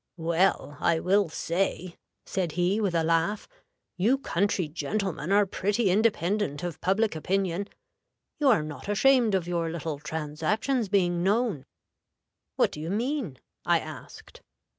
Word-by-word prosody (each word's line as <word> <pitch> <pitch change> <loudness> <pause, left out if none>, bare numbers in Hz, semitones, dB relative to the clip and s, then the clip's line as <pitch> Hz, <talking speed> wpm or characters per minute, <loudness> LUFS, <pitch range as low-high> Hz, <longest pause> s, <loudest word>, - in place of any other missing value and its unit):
'Well, 165 -3 +1
I 165 -1 +2
will 195 +1 +2
say,' 175 +2 -2 0.3
said 180 -5 -2
he, 180 +5 +1
with 195 -5 0
a 165 - +2
laugh, 165 +5 0 0.5
'you 225 +9 +3
country 195 - 0
gentlemen 165 +2 -3
are 205 +1 +5
pretty 200 +2 0
independent 200 -6 +1
of 175 -3 -5
public 205 +1 +1
opinion. 190 +3 -1 0.7
You 295 - +2
are 220 - +4
not 155 +5 -8
ashamed 235 0 +4
of 175 -3 -1
your 170 -2 -1
little 160 -3 -4
transactions 160 - -2
being 175 -3 +2
known!' 200 - 0 0.9
'What - - +2
do - - -8
you 160 +2 -4
mean?' 230 - -2 0.3
I - - +3
asked. - - -10
185 Hz, 140 wpm, -27 LUFS, 165-205 Hz, 0.9 s, are